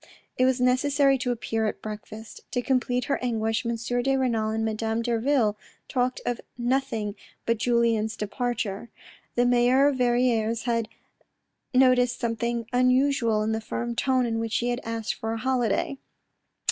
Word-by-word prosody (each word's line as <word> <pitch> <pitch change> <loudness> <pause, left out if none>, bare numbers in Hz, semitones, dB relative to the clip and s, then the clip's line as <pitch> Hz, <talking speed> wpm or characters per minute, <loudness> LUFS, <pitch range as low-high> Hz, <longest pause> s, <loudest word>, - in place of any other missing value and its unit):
It 255 - +3
was 260 0 +2
necessary 275 +2 +3
to 250 0 -1
appear 225 -2 -1
at - - -4
breakfast. 215 +1 -8
To 245 -1 0
complete 250 -1 0
her 280 - 0
anguish, 225 -2 0
M. 235 - 0
de 245 +3 0
Renal 230 -4 0
and 220 0 -1
Madame 220 +1 -1
Derville 235 -1 +1 0.3
talked 250 0 -1
of 245 -1 -2 0.2
nothing 240 -4 -1 0.3
but 230 -1 +1
Julien's 230 -2 +1
departure. 235 -1 -3 0.5
The 245 - +3
mayor 245 +3 +4
of 275 - -2
Verrieres 240 -2 +2
had 230 -2 0 0.8
noticed 250 -1 +4
something 235 0 -1
unusual 250 -3 +3
in 220 - 0
the 220 0 -1
firm 235 +1 -4
tone 255 0 +2
in 225 -1 -1
which 225 -1 -1
he 240 - 0
had 245 +1 -2
asked 225 -1 -3
for 225 0 -4
a - - -3
holiday. 255 +2 0
240 Hz, 155 wpm, -26 LUFS, 225-255 Hz, 0.8 s, mayor